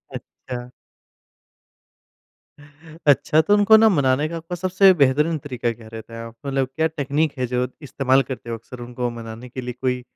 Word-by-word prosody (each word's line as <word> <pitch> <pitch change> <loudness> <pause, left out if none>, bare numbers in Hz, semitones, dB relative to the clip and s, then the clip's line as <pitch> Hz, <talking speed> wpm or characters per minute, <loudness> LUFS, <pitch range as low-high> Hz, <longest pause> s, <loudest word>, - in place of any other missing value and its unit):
अच्छा। 125 -1 -8 2.4
अच्छा, 150 +2 +4
तो 205 +6 +3
उनको 210 +1 +6
ना 220 0 +6
मनाने 145 -4 +2
का 170 - -5
आपका 165 +2 -6
सबसे 185 +2 +4
बेहतरीन 150 +2 +2
तरीका 125 -4 -3
क्या 110 -1 -14
रहता 115 +1 -9
है? 115 - -7
आप 115 - -12
मतलब 135 -1 0
क्या 160 - +2
टेक्निक 150 -1 -1
है 125 - 0
जो 125 +1 0 0.2
इस्तेमाल 135 -1 +2
करते 120 -2 -6
हो 115 - -2
अक्सर 120 +2 -12
उनको 120 0 -4
मनाने 115 +1 -9
के 130 +2 -6
लिए? 125 0 -5
कोई 125 -1 -1
130 Hz, 170 wpm, -22 LUFS, 120-160 Hz, 2.4 s, उनको